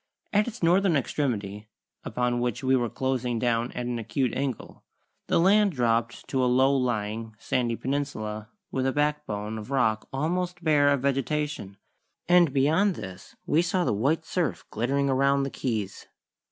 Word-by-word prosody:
At 210 +2 +3
its 240 -5 -7
northern 180 +1 +4
extremity, 110 -7 -2 0.3
upon 125 -1 -1
which 120 0 -2
we 130 0 +3
were 120 -2 0
closing 125 -2 -1
down 115 0 0
at 125 - -4
an 120 -1 -2
acute 115 +3 -1
angle, 135 -4 -4 0.4
the - - +2
land 200 +2 +4
dropped 120 -2 0
to 130 -2 +1
a 125 - +3
low 130 +2 +4
lying, 110 -3 -2
sandy 120 +1 -1
peninsula 110 -6 -3 0.2
with 130 0 0
a - - +2
backbone 130 -8 -1
of 105 - -9
rock 110 -6 +1
almost 175 +5 -2
bare 145 -3 +4
of 140 -2 +1
vegetation, 140 -6 -1 0.5
and 175 -3 +5
beyond 160 +9 +2
this 95 0 -9
we 155 - +3
saw 180 +1 0
the - - +1
white 140 +10 0
surf 125 - -2
glittering 135 +5 0
around 140 +1 +2
the 135 - -3
Keys. 110 -7 -3
130 Hz, 160 wpm, -26 LUFS, 115-150 Hz, 0.5 s, and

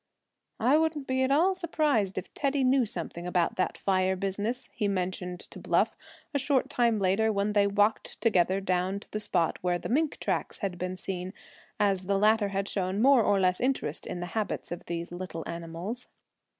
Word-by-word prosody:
"I 255 +7 +4
wouldn't 315 -3 0
be 260 0 0
at 260 - +2
all 330 +8 +4
surprised 300 - 0
if 185 - -5
Teddy 275 -1 0
knew 255 -2 +3
something 170 -2 -5
about 180 -1 +1
that 185 - 0
fire 190 -1 +1
business," 205 +6 -2
he 210 -4 0
mentioned 180 -2 -2
to - - -12
Bluff, - - +1 0.4
a 285 - +1
short 275 -1 +1
time 235 -2 +2
later, 200 +3 +2
when 205 0 0
they 205 -1 +4
walked 205 +2 +1
together 190 -4 +3
down 185 +1 0
to - - -17
the 215 - -2
spot 175 -5 0
where 180 -1 +1
the - - -6
mink 295 +5 +1
tracks - - -2
had 190 -4 -4
been 180 0 -3
seen, 185 0 -5 0.5
as 195 -3 +1
the 200 0 +2
latter 215 +1 +4
had 195 0 -2
shown 190 0 -1
more 265 +1 +6
or 205 -2 +3
less 185 -1 +2
interest 255 - -1
in 175 - -4
the - - -2
habits 215 -5 -2
of 175 - -6
these 170 0 -4
little 175 -2 -5
animals. 170 +8 -5
200 Hz, 190 wpm, -29 LUFS, 180-240 Hz, 0.5 s, more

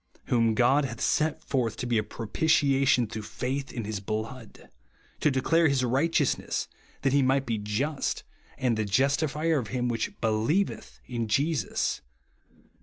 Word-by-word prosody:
"Whom 115 -2 +3
God 130 +5 +4
hath 120 -3 -5
set 155 +1 +1
forth 120 -5 -1
to 125 - -3
be 120 -2 +2
a - - -1
propitiation 135 +2 +2
through 110 0 -6
faith 130 +6 -4
in 115 - -4
his 105 -1 -3
blood.... 110 +4 -6 0.5
to - - +3
declare 160 +5 +3
his 135 -3 +1
righteousness: 140 +3 +1 0.4
that 135 -1 +2
he 140 - +4
might 135 +1 +2
be 115 -2 -1
just, 125 +9 -2 0.3
and 125 -3 +1
the 110 - 0
justifier 140 +7 +1
of 115 - -5
him 125 +1 -1
which 115 -2 -1
helieveth 110 - 0
in 115 -2 -3
Jesus," 140 +5 0 0.5
(Rom. - - -30
125 Hz, 155 wpm, -27 LUFS, 110-140 Hz, 0.5 s, God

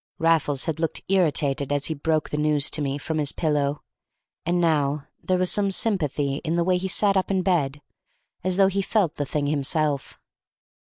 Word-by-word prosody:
Raffles 160 -4 +2
had 160 -2 -2
looked 165 -2 -1
irritated 150 -7 +1
as 145 0 0
he 160 - -2
broke 155 +1 -1
the 150 - -1
news 150 -1 +2
to 155 - -1
me 140 -1 -1
from 155 +2 -3
his 145 -2 0
pillow, 150 -2 -1 0.6
and 175 +1 +2
now 150 -4 +1 0.2
there 185 - +1
was 180 -1 +2
some 200 +1 +2
sympathy 150 - 0
in 165 +2 -2
the 170 - +2
way 180 +1 +2
he 190 - -3
sat 200 +2 +2
up 190 - +1
in 190 -2 +1
bed, 145 -6 0 0.6
as 185 0 0
though 195 - +6
he 195 +1 +1
felt 195 -4 0
the 145 - -2
thing 145 0 -1
himself. 145 0 -1
155 Hz, 195 wpm, -24 LUFS, 145-180 Hz, 0.6 s, though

